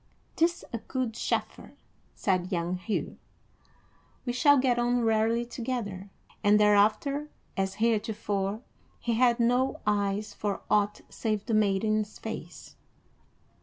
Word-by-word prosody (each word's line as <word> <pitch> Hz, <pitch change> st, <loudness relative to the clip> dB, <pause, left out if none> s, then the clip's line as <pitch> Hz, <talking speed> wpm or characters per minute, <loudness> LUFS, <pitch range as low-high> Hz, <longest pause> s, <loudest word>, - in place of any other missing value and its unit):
"'Tis 340 Hz, +1 st, +1 dB
a 230 Hz, -, -2 dB
good 255 Hz, 0 st, -3 dB
chaffer," -, -, -3 dB, 0.4 s
said 185 Hz, -1 st, 0 dB
young 175 Hz, 0 st, -1 dB
Hugh. 205 Hz, +4 st, -3 dB, 1.1 s
"We 245 Hz, -, -1 dB
shall 285 Hz, +3 st, +5 dB
get 255 Hz, -2 st, +2 dB
on 240 Hz, 0 st, +2 dB
rarely 225 Hz, +1 st, +2 dB
together;" 230 Hz, -6 st, -4 dB, 0.3 s
and 210 Hz, 0 st, +5 dB
thereafter, 215 Hz, +8 st, +3 dB, 0.3 s
as 190 Hz, -1 st, -1 dB
heretofore, 215 Hz, -2 st, -1 dB, 0.4 s
he 235 Hz, -, -1 dB
had 240 Hz, +1 st, +3 dB
no 245 Hz, +3 st, +2 dB
eyes 205 Hz, 0 st, 0 dB
for 205 Hz, -2 st, -3 dB
aught 210 Hz, 0 st, +2 dB
save 215 Hz, -3 st, -2 dB
the 230 Hz, -, -2 dB
maiden's 215 Hz, +1 st, +1 dB
face. -, -, -8 dB
215 Hz, 120 wpm, -28 LUFS, 205-240 Hz, 1.1 s, shall